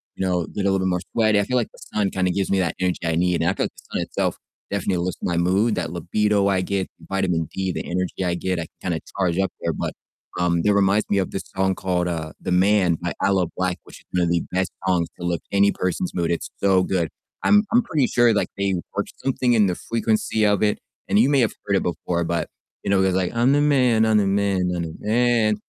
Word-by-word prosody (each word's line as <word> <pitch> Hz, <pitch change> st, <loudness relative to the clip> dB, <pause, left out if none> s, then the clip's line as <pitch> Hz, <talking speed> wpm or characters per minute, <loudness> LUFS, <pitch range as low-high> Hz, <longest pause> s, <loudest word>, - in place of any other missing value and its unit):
you 95 Hz, -, -2 dB
know, 90 Hz, -2 st, 0 dB
get 105 Hz, -, -5 dB
a 100 Hz, -, +3 dB
little 95 Hz, -, +1 dB
bit 95 Hz, -, 0 dB
more 90 Hz, -1 st, 0 dB
sweaty, 110 Hz, -2 st, +3 dB
I -, -, +2 dB
feel 125 Hz, +5 st, 0 dB
like 120 Hz, -, +1 dB
the -, -, -16 dB
sun 105 Hz, -2 st, +1 dB
kinda 95 Hz, -1 st, 0 dB
gives 95 Hz, +1 st, -1 dB
me 100 Hz, -, +2 dB
that 85 Hz, -3 st, 0 dB
energy 90 Hz, -1 st, 0 dB
I 80 Hz, -1 st, 0 dB
need, 90 Hz, 0 st, +1 dB
and 85 Hz, -, +2 dB
I -, -, +1 dB
feel -, -, -1 dB
like -, -, -5 dB
the -, -, -16 dB
sun -, -, 0 dB
itself -, -, -2 dB, 0.3 s
definitely 95 Hz, -3 st, 0 dB
lifts 90 Hz, 0 st, -3 dB
my 90 Hz, -, -1 dB
mood, 95 Hz, +6 st, +2 dB
that 85 Hz, -3 st, -3 dB
libido 100 Hz, +4 st, +1 dB
I 95 Hz, -2 st, +2 dB
get, 95 Hz, 0 st, -1 dB
the 80 Hz, -, -16 dB
vitamin 90 Hz, -5 st, 0 dB
D, 95 Hz, -1 st, -1 dB
the -, -, -4 dB
energy 90 Hz, +1 st, -2 dB
I 90 Hz, -1 st, 0 dB
get, 90 Hz, +1 st, -2 dB
I 85 Hz, -, -3 dB, 0.2 s
can 90 Hz, -, -2 dB
kinda 80 Hz, -, -2 dB, 0.2 s
charge 90 Hz, -3 st, +1 dB
up 95 Hz, 0 st, +1 dB
there, -, -, -1 dB
but, -, -, -3 dB, 0.5 s
um, 85 Hz, -1 st, +2 dB
that 105 Hz, +4 st, +3 dB
reminds 100 Hz, +1 st, +2 dB
me 100 Hz, -, +2 dB
of 95 Hz, -, 0 dB
this 95 Hz, -, -4 dB
song 95 Hz, 0 st, +1 dB
called, 90 Hz, -2 st, -1 dB
uh, 80 Hz, -3 st, -3 dB
"The -, -, -4 dB
Man" 95 Hz, -1 st, +3 dB
by 85 Hz, +2 st, -4 dB
Aloe 95 Hz, -4 st, +2 dB
Blacc, 90 Hz, -1 st, +1 dB
which -, -, -14 dB
is -, -, -24 dB
one 90 Hz, -1 st, +1 dB
of 85 Hz, -, +1 dB
the 85 Hz, -1 st, +1 dB
best 95 Hz, 0 st, 0 dB, 0.2 s
songs 90 Hz, -3 st, +1 dB
to 90 Hz, -, -5 dB
lift 85 Hz, -2 st, -2 dB
any 100 Hz, 0 st, +4 dB
person's 90 Hz, 0 st, -2 dB
mood, 85 Hz, -1 st, 0 dB
it's 85 Hz, -, -2 dB
so 95 Hz, -2 st, +4 dB
good, 85 Hz, -4 st, 0 dB, 0.3 s
I'm 205 Hz, 0 st, +5 dB
I'm 240 Hz, -, +6 dB
pretty 155 Hz, -, +1 dB
sure, 120 Hz, -1 st, +4 dB
like, 105 Hz, -, +1 dB
they 100 Hz, -1 st, 0 dB, 0.2 s
worked -, -, -2 dB
something 130 Hz, -2 st, +1 dB
in 110 Hz, -3 st, +5 dB
the 90 Hz, -, -1 dB
frequency 110 Hz, 0 st, 0 dB
of 105 Hz, 0 st, +2 dB
it, 105 Hz, -1 st, +1 dB, 0.3 s
and 105 Hz, -, +4 dB
you 120 Hz, -, +5 dB
may 140 Hz, -1 st, +3 dB
have 115 Hz, -, +2 dB
heard 100 Hz, -, +1 dB
it -, -, -1 dB
before, 85 Hz, 0 st, -2 dB
but 85 Hz, 0 st, -1 dB, 0.4 s
you -, -, -3 dB
know, 100 Hz, -, +4 dB
it -, -, +3 dB
goes 95 Hz, -, +1 dB
like, 95 Hz, -1 st, 0 dB
"I'm 120 Hz, +3 st, +3 dB
the 145 Hz, -, +3 dB
man, 125 Hz, -6 st, +3 dB
I'm 110 Hz, 0 st, +3 dB
the 100 Hz, -2 st, +2 dB
man, 95 Hz, -2 st, +1 dB
I'm 85 Hz, -, -2 dB
the 80 Hz, -1 st, -5 dB
man," 115 Hz, -1 st, +2 dB
95 Hz, 265 wpm, -23 LUFS, 90-105 Hz, 0.5 s, I'm